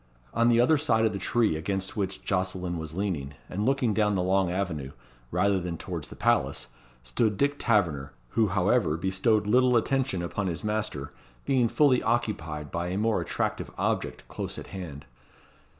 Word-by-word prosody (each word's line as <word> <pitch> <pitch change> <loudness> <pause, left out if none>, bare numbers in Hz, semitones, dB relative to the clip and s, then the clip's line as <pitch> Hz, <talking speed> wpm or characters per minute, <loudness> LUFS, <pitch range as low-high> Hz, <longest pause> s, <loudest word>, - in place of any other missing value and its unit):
On 115 +1 +3
the 120 0 +4
other 140 +5 +4
side 115 -7 +3
of 110 - +1
the 100 - -3
tree 110 -1 +2
against 95 +4 -2
which 95 -2 -3
Jocelyn 90 -2 -1
was 80 0 -6
leaning, 80 -8 -2
and 105 +5 -2
looking 135 -5 +2
down 105 -1 +2
the 90 - +1
long 95 0 +2
avenue, 85 -7 -3 0.4
rather 95 +4 +2
than 85 -2 -4
towards - - -5
the - - -10
palace, - - +1 0.3
stood 100 - 0
Dick 145 +3 +1
Taverner, 85 - +1 0.2
who 110 - +2
however 95 -2 +2
bestowed 95 +5 +1
little 125 +3 +4
attention 130 -6 0
upon 95 +3 -2
his 85 -3 -3
master, 105 -10 -2 0.3
being 130 -3 +3
fully 130 +1 +4
occupied 85 -11 -1
by 85 +1 -2
a 90 +2 -2
more 110 +1 +1
attractive - - -2
object - - -2
close - - -5
at - - -7
hand. 80 -7 -7
100 Hz, 170 wpm, -27 LUFS, 85-115 Hz, 0.4 s, the